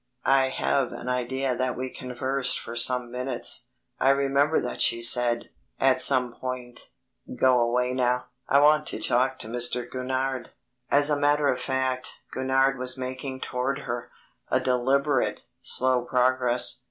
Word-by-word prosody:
I 135 Hz, -1 st, +3 dB
have 135 Hz, 0 st, -1 dB
an -, -, -8 dB
idea 125 Hz, +1 st, -1 dB
that 130 Hz, +1 st, -2 dB
we 130 Hz, 0 st, -4 dB
conversed 130 Hz, +1 st, -2 dB
for 115 Hz, -, -9 dB
some 120 Hz, +1 st, +3 dB
minutes. 125 Hz, -1 st, 0 dB, 0.3 s
I 135 Hz, -, +3 dB
remember 140 Hz, +2 st, +2 dB
that -, -, -4 dB
she 115 Hz, -, +4 dB
said, 120 Hz, 0 st, +4 dB, 0.3 s
at 130 Hz, -1 st, +3 dB
some 125 Hz, -3 st, +4 dB
point, 125 Hz, -1 st, -7 dB, 0.5 s
"Go 130 Hz, -1 st, +4 dB
away 125 Hz, +2 st, 0 dB
now; 125 Hz, -1 st, 0 dB, 0.2 s
I 140 Hz, +1 st, +4 dB
want 150 Hz, +1 st, +4 dB
to -, -, -3 dB
talk 130 Hz, +2 st, +1 dB
to -, -, -6 dB
Mr. 120 Hz, +1 st, 0 dB
Gurnard." 130 Hz, 0 st, -3 dB, 0.4 s
As 145 Hz, +1 st, +4 dB
a 145 Hz, -, +1 dB
matter 145 Hz, 0 st, +2 dB
of 125 Hz, -, -1 dB
fact, 130 Hz, -1 st, -2 dB, 0.2 s
Gurnard 135 Hz, 0 st, +1 dB
was 130 Hz, +1 st, 0 dB
making 130 Hz, +1 st, -6 dB
toward 135 Hz, +3 st, -3 dB
her 120 Hz, -2 st, -5 dB, 0.4 s
a -, -, +2 dB
deliberate, 130 Hz, +2 st, 0 dB, 0.2 s
slow 130 Hz, -1 st, +1 dB
progress. 125 Hz, -1 st, 0 dB
130 Hz, 150 wpm, -25 LUFS, 125-135 Hz, 0.5 s, she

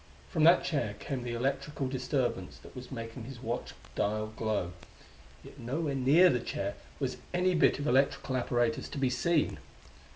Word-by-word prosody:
From 155 Hz, -, +1 dB
that 170 Hz, +2 st, +7 dB
chair 120 Hz, -10 st, -1 dB
came 135 Hz, -3 st, -4 dB
the 120 Hz, -1 st, -3 dB
electrical 135 Hz, +2 st, -1 dB
disturbance 130 Hz, -7 st, -1 dB
that -, -, -15 dB
was 125 Hz, -1 st, -9 dB
making 115 Hz, +1 st, -6 dB
his 130 Hz, -1 st, -8 dB
watch 120 Hz, 0 st, -4 dB, 0.2 s
dial 110 Hz, +1 st, -1 dB
glow 105 Hz, -6 st, -1 dB, 0.7 s
yet -, -, -13 dB
nowhere 140 Hz, +5 st, -2 dB
near 140 Hz, +8 st, +6 dB
the 125 Hz, -, +1 dB
chair 100 Hz, -3 st, -3 dB, 0.3 s
was -, -, -2 dB, 0.2 s
any 180 Hz, +1 st, +3 dB
bit 165 Hz, -, +4 dB
of 145 Hz, -, -4 dB
electrical 135 Hz, 0 st, +2 dB
apparatus 120 Hz, -2 st, 0 dB
to -, -, -6 dB
be 130 Hz, -2 st, +2 dB
seen. 165 Hz, +4 st, +1 dB
130 Hz, 165 wpm, -31 LUFS, 115-140 Hz, 0.7 s, that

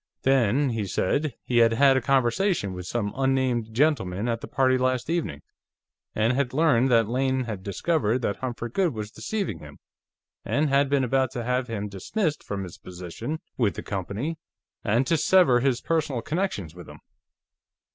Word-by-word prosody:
Then, 135 Hz, +1 st, +3 dB
he 110 Hz, -3 st, -2 dB
said, 135 Hz, -, 0 dB
he 120 Hz, -, -1 dB
had 115 Hz, -1 st, +5 dB
had 135 Hz, +3 st, +5 dB
a 130 Hz, -, +2 dB
conversation 130 Hz, -, +1 dB
with 90 Hz, -1 st, -7 dB
some 105 Hz, -4 st, -2 dB
unnamed 130 Hz, -4 st, 0 dB
gentleman 115 Hz, -7 st, +1 dB
at 115 Hz, -1 st, -1 dB
the -, -, -7 dB
party 130 Hz, -1 st, +2 dB
last 130 Hz, +2 st, 0 dB
evening, 160 Hz, -, -2 dB, 0.7 s
and 110 Hz, +3 st, +2 dB
had 130 Hz, -1 st, -1 dB
learned 135 Hz, -5 st, +3 dB
that 115 Hz, -3 st, +4 dB
Lane 130 Hz, +2 st, 0 dB
had 110 Hz, -6 st, -5 dB
discovered 120 Hz, -, 0 dB
that 100 Hz, -, -1 dB
Humphrey 120 Hz, -2 st, -5 dB
Goode 175 Hz, -3 st, +1 dB
was 105 Hz, -1 st, -5 dB
deceiving 195 Hz, -, -3 dB
him, 75 Hz, -1 st, -12 dB, 0.7 s
and 150 Hz, +1 st, +1 dB
had 140 Hz, 0 st, +3 dB
been 140 Hz, -1 st, +2 dB
about 130 Hz, +1 st, +1 dB
to 120 Hz, -3 st, -3 dB
have 125 Hz, +1 st, 0 dB
him 105 Hz, -3 st, -3 dB
dismissed 150 Hz, -, -2 dB
from 100 Hz, -1 st, -4 dB
his 90 Hz, -2 st, -10 dB
position 90 Hz, -, -6 dB, 0.2 s
with 110 Hz, -5 st, +2 dB
the -, -, -6 dB
company, 105 Hz, -, -4 dB, 0.4 s
and 115 Hz, +4 st, +2 dB
to 165 Hz, -, +2 dB
sever 155 Hz, -9 st, +5 dB
his 130 Hz, -1 st, +1 dB
personal 150 Hz, -7 st, -1 dB
connections 150 Hz, -, -2 dB
with 90 Hz, -1 st, -11 dB
him." -, -, -13 dB
125 Hz, 175 wpm, -25 LUFS, 105-140 Hz, 0.7 s, had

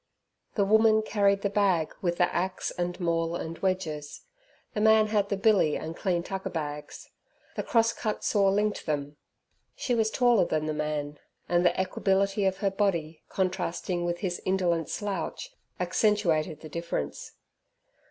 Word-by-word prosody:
The 200 Hz, -, +2 dB
woman 220 Hz, +1 st, +5 dB
carried 200 Hz, -2 st, +2 dB
the 200 Hz, -, +1 dB
bag 190 Hz, -6 st, +2 dB
with 175 Hz, -3 st, 0 dB
the 175 Hz, -, +2 dB
axe 185 Hz, +2 st, -1 dB
and 175 Hz, +1 st, -3 dB
maul 165 Hz, -1 st, 0 dB
and 165 Hz, -1 st, -5 dB
wedges; 160 Hz, -6 st, -2 dB, 0.5 s
the 210 Hz, -, -1 dB
man 220 Hz, 0 st, +6 dB
had 205 Hz, -2 st, +1 dB
the 200 Hz, -, 0 dB
billy 200 Hz, -7 st, +3 dB
and 160 Hz, +1 st, -6 dB
clean 175 Hz, -2 st, 0 dB
tucker 190 Hz, +1 st, -4 dB
bags; 150 Hz, -2 st, -6 dB, 0.4 s
the -, -, -1 dB
cross 230 Hz, -1 st, +2 dB
cut 215 Hz, -2 st, -3 dB
saw 200 Hz, -2 st, +3 dB
linked 205 Hz, 0 st, 0 dB
them. 145 Hz, -1 st, -2 dB, 0.6 s
She 250 Hz, -, -1 dB
was 225 Hz, -2 st, +2 dB
taller 240 Hz, -5 st, +3 dB
than 155 Hz, -2 st, -1 dB
the 155 Hz, -, -1 dB
man, 150 Hz, -1 st, -3 dB, 0.3 s
and 175 Hz, 0 st, +2 dB
the 175 Hz, 0 st, +2 dB
equability 195 Hz, +1 st, +1 dB
of 190 Hz, 0 st, 0 dB
her 195 Hz, -, +3 dB
body, 170 Hz, -6 st, -1 dB
contrasting 180 Hz, -1 st, -1 dB
with 175 Hz, 0 st, -2 dB
his 180 Hz, -3 st, -2 dB
indolent 175 Hz, -4 st, 0 dB
slouch, 205 Hz, -, -4 dB, 0.3 s
accentuated 170 Hz, -8 st, +1 dB
the 155 Hz, -, -9 dB
difference. 170 Hz, -, -4 dB
185 Hz, 155 wpm, -28 LUFS, 165-205 Hz, 0.6 s, man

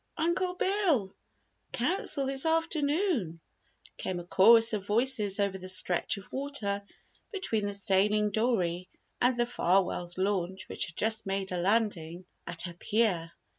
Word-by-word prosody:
Uncle 360 Hz, +2 st, 0 dB
Bill! 360 Hz, -, +1 dB, 0.6 s
Council 280 Hz, 0 st, 0 dB
this 270 Hz, 0 st, +1 dB
afternoon!" 315 Hz, -, 0 dB, 0.6 s
came 180 Hz, -1 st, -3 dB
a -, -, -7 dB
chorus 225 Hz, +6 st, +5 dB
of 205 Hz, -2 st, -2 dB
voices 210 Hz, -1 st, +1 dB
over 200 Hz, -1 st, 0 dB
the 185 Hz, 0 st, -7 dB
stretch 185 Hz, +1 st, 0 dB
of 195 Hz, -, -12 dB
water 260 Hz, -8 st, -1 dB, 0.5 s
between 225 Hz, -, -1 dB
the 205 Hz, -, -4 dB
sailing 205 Hz, +2 st, +2 dB
dory 185 Hz, -6 st, 0 dB, 0.3 s
and 245 Hz, 0 st, +3 dB
the 240 Hz, -, +3 dB
Farwell's 180 Hz, -5 st, 0 dB
launch 190 Hz, -1 st, -1 dB
which -, -, -2 dB
had 170 Hz, -, -9 dB
just 220 Hz, -1 st, -1 dB
made 195 Hz, 0 st, -2 dB
a 180 Hz, -, -2 dB
landing 185 Hz, -4 st, 0 dB, 0.2 s
at 170 Hz, 0 st, -2 dB
her 175 Hz, -1 st, -5 dB
pier. 180 Hz, -3 st, 0 dB
205 Hz, 140 wpm, -29 LUFS, 185-255 Hz, 0.6 s, chorus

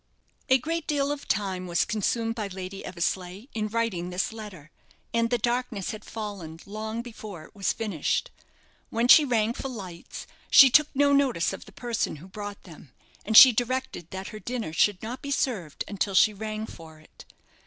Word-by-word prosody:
A 260 Hz, -, +7 dB
great 330 Hz, +4 st, -3 dB
deal 285 Hz, -1 st, +1 dB
of 290 Hz, -1 st, -5 dB
time 190 Hz, -3 st, -1 dB
was 175 Hz, -1 st, +1 dB
consumed 225 Hz, +1 st, -1 dB
by 215 Hz, -3 st, -4 dB
Lady 190 Hz, 0 st, -7 dB
Eversleigh 185 Hz, +3 st, -3 dB
in 215 Hz, -1 st, -1 dB
writing 215 Hz, -6 st, -2 dB
this 180 Hz, +4 st, -2 dB
letter, 195 Hz, -9 st, -10 dB, 0.4 s
and 230 Hz, 0 st, +2 dB
the 245 Hz, -, +2 dB
darkness 240 Hz, -3 st, -1 dB
had 215 Hz, -1 st, -8 dB
fallen 200 Hz, -7 st, -7 dB
long 220 Hz, +3 st, -5 dB
before 215 Hz, -8 st, -9 dB
it -, -, -16 dB
was 195 Hz, -2 st, 0 dB
finished. 205 Hz, -10 st, -2 dB, 0.6 s
When 230 Hz, +2 st, +1 dB
she 300 Hz, -, +9 dB
rang 230 Hz, -4 st, +1 dB
for 270 Hz, -, -5 dB
lights, 185 Hz, -8 st, -8 dB, 0.2 s
she 270 Hz, -2 st, +9 dB
took 300 Hz, +3 st, +6 dB
no 285 Hz, +1 st, +4 dB
notice 260 Hz, -12 st, +2 dB
of -, -, -8 dB
the -, -, -14 dB
person 240 Hz, -8 st, -2 dB
who 160 Hz, +5 st, -12 dB
brought 205 Hz, +1 st, -8 dB
them, 160 Hz, -6 st, -14 dB, 0.3 s
and 220 Hz, +2 st, +4 dB
she 260 Hz, -, +12 dB
directed 245 Hz, -7 st, -2 dB
that 190 Hz, +1 st, -6 dB
her 215 Hz, -, -8 dB
dinner 235 Hz, -8 st, -4 dB
should 205 Hz, +3 st, +2 dB
not 240 Hz, +4 st, -5 dB
be 280 Hz, -, -6 dB
served 210 Hz, -, -1 dB
until 200 Hz, -1 st, -2 dB
she 215 Hz, +3 st, +6 dB
rang 215 Hz, +1 st, -4 dB
for 160 Hz, -5 st, -12 dB
it. 155 Hz, -, -16 dB
215 Hz, 185 wpm, -27 LUFS, 185-240 Hz, 0.6 s, she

